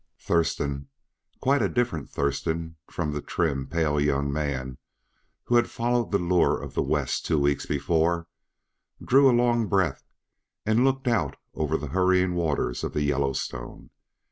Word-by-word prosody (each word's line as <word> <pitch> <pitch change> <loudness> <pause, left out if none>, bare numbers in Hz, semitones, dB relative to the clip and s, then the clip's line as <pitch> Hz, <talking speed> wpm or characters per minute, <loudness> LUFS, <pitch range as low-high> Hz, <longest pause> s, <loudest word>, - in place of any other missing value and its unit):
Thurston 70 -4 -1 0.5
quite 140 0 +3
a 100 - +2
different 120 - -1
Thurston 80 +3 -2
from 75 -4 -2
the 75 0 -3
trim, 70 -7 -1
pale 75 0 0
young 70 -1 +1
man 65 -4 -3 0.6
who 120 - +3
had 120 - +2
followed 120 0 0
the 100 - +3
lure 90 -1 +2
of - - -8
the - - +1
West - - -1
two 80 - +1
weeks 70 0 +1
before 85 +3 +1 0.7
drew 135 +1 +5
a 120 -1 +4
long 120 -2 +2
breath 95 -9 +1 0.6
and 110 +3 +3
looked 135 0 +1
out 115 -3 +1 0.2
over 80 0 0
the 75 -1 -6
hurrying 95 0 +3
waters 75 -8 -1
of - - -3
the 75 - 0
Yellowstone. 70 -4 -2
80 Hz, 150 wpm, -26 LUFS, 70-110 Hz, 0.7 s, drew